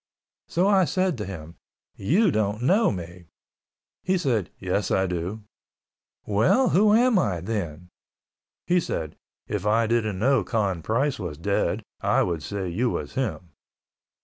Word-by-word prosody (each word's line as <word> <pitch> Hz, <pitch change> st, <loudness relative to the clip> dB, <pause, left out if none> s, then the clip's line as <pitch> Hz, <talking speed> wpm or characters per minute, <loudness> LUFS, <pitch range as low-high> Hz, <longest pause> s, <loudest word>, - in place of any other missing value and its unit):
So 175 Hz, +3 st, +1 dB
I 195 Hz, -2 st, +4 dB
said 185 Hz, 0 st, 0 dB
to 105 Hz, -, -3 dB
him, 85 Hz, -4 st, -8 dB, 0.4 s
"You 180 Hz, -, +2 dB
don't 105 Hz, -1 st, -1 dB
know 200 Hz, -, +4 dB
me." 90 Hz, -1 st, -7 dB, 0.8 s
He 185 Hz, 0 st, +1 dB
said, 120 Hz, -, 0 dB
"Yes, 95 Hz, +2 st, -1 dB
I 95 Hz, -, +2 dB
do." 90 Hz, +4 st, -4 dB, 0.8 s
"Well, 115 Hz, -, +3 dB
who 210 Hz, +3 st, +4 dB
am 240 Hz, -3 st, +4 dB
I 95 Hz, -, 0 dB
then?" 90 Hz, -4 st, -4 dB, 0.8 s
He 180 Hz, +1 st, +3 dB
said, 80 Hz, -, -4 dB, 0.3 s
"If 105 Hz, -3 st, -3 dB
I 110 Hz, +2 st, +3 dB
didn't 110 Hz, -3 st, 0 dB
know 125 Hz, +2 st, +3 dB
Con 95 Hz, -4 st, -1 dB
Price 130 Hz, -, 0 dB
was 85 Hz, -7 st, -5 dB
dead, 100 Hz, +5 st, -1 dB, 0.2 s
I -, -, +3 dB
would 85 Hz, -3 st, -2 dB
say 95 Hz, +6 st, -4 dB
you 115 Hz, +9 st, 0 dB
was -, -, -4 dB
him." 105 Hz, -9 st, -3 dB
105 Hz, 150 wpm, -25 LUFS, 90-145 Hz, 0.8 s, I